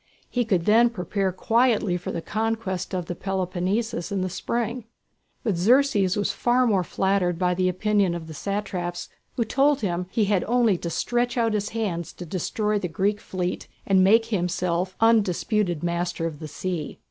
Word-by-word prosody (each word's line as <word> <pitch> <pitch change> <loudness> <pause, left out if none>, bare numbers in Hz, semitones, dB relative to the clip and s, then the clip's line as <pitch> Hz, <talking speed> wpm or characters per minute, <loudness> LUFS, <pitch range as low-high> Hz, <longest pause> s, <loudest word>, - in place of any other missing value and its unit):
He 245 -1 +1
could 185 -6 +1
then 230 +3 +5
prepare 195 -2 -2
quietly 225 -1 +2
for 180 - -4
the 165 - -4
conquest 220 -4 -2
of 180 -2 -2
the 175 - -4
Peloponnesus 190 +2 -2
in 195 -2 -1
the 185 - -1
spring. 235 +4 -2 0.6
But 210 -7 0
Xerxes 210 -2 +3
was 205 - 0
more 240 -6 +3
flattered 190 -1 0
by 180 0 +1
the 185 +1 +1
opinion 195 -1 +1
of 170 -2 -6
the 160 - -9
satraps 185 -1 -3 0.3
who 235 - 0
told 275 +4 +2
him 180 -3 -1
that - - -32
he 220 - +2
had 200 -2 +1
only 235 -3 +3
to 170 - -4
stretch 240 +7 -1
out 230 -2 +2
his 210 -1 -1
hands 195 -7 -3
to 175 - -8
destroy 210 +5 -1
the 180 - -2
Greek 200 +5 -1
fleet 180 -1 -3 0.2
and 190 -1 +4
make 225 +4 +5
himself 180 -3 -1
undisputed 210 -5 +2
master 175 0 -1
of 155 -3 -4
the 155 - -6
sea. 165 0 -4
195 Hz, 175 wpm, -25 LUFS, 180-225 Hz, 0.6 s, then